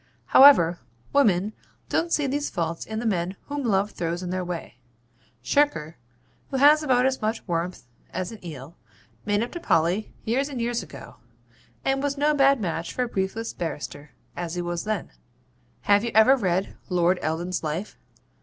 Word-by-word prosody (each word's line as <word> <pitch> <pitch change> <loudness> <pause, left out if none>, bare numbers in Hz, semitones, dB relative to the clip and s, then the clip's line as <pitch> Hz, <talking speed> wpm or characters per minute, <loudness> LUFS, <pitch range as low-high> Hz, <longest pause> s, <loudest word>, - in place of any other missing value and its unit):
However, 175 -12 +7 0.3
women 210 -7 +3 0.3
don't 335 0 0
see 295 - +2
these 285 +2 -1
faults 165 -1 -3
in 220 - -5
the 235 - -3
men 185 -3 -1
whom 285 0 -4
Love 205 -3 +1
throws 170 +1 -3
in 180 - -4
their 185 0 -2
way. 170 -8 -6 0.6
Shirker, 165 - +1 0.5
who 270 - -2
has 295 +3 +6
about 255 -4 +2
as 265 -1 0
much 220 +1 -2
warmth 175 -1 -2 0.3
as 185 +1 -4
an 220 -4 -11
eel, 150 -2 -9 0.5
made 205 +1 +2
up 240 - -5
to 345 - -6
Polly 180 - +1
years 265 +6 0
and 265 -4 -5
years 235 0 -1
ago, 140 -8 -11 0.7
and 270 0 +1
was 285 0 -1
no 295 +2 +3
bad 275 -2 +4
match 165 -4 -3
for 250 - -1
a - - -2
briefless 225 +2 -3
barrister, 150 -2 -6 0.2
as 175 -1 -4
he 175 - -2
was 175 +1 -3
then. 215 -4 -3 0.7
Have 205 +1 +3
you 235 - -1
ever 220 +5 +7
read 190 -5 -1
Lord 180 0 +2
Eldon's 170 +3 -2
Life? 160 +7 -4
200 Hz, 175 wpm, -25 LUFS, 175-260 Hz, 0.7 s, However